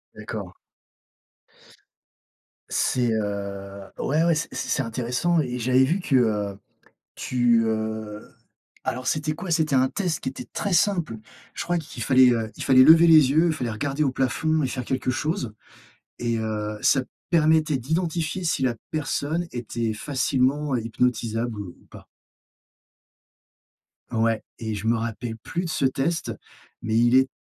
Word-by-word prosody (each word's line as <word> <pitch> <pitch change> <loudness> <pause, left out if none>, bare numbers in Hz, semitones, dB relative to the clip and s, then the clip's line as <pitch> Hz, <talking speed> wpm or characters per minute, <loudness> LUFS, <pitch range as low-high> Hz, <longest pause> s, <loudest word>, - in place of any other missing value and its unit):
D'accord. - - -7 2.2
C'est, 120 -2 +1
heu, 100 -2 -4 0.2
ouais, 155 +4 +1
ouais, 170 -1 +4
c'est 150 - -2
c'est 135 - -1
intéressant 125 +8 0
et 125 -4 -2
j'avais 130 +2 +3
vu 170 +9 +1
que, 150 -6 0
heu, 105 -5 +1 0.6
tu, 120 -2 +2
heu, 110 -1 -3 0.5
alors 125 +2 -3
c'était 155 0 0
quoi? 180 +1 -4
C'était 155 -4 +2
un 130 0 +3
test 175 0 -2
qui - - -3
était 130 - -9
très 200 - -2
simple. 170 - +1 0.4
Je - - -4
crois 175 0 0
qu'il 160 -1 -7
fallait, 130 -1 +6
heu, 115 -2 -1
il - - -5
fallait 130 -1 +7
lever 165 +4 +8
les 155 -5 +7
yeux, 160 +4 +4
il 165 - +2
fallait 125 -6 -3
regarder 140 +7 -2
au 135 - +2
plafond 150 +5 0
et - - +1
faire 125 -2 -4
quelque 130 0 -1
chose. 155 - -2 0.7
Et 115 -1 -1
heu, 105 -1 -3
ça 135 - +4 0.3
permettait 155 -3 +3
d'identifier 165 +5 -2
si 160 - 0
la 125 -2 +1 0.2
personne 155 +2 -2
était 115 -2 -3
facilement 135 +2 0
hypnotisable 115 -1 -1
ou, 95 - -9
ou - - -25
pas. - - -13 2.1
Ouais 115 -1 +1 0.2
et 110 -2 -3
je 105 +2 -6
me 115 0 +3
rappelle 115 0 -4
plus 170 +9 -4
de 165 - -4
ce 135 - 0
test, 135 +6 -1 0.5
mais 110 0 -1
il 120 +2 +4
est 130 0 +4
130 Hz, 155 wpm, -24 LUFS, 115-155 Hz, 2.2 s, lever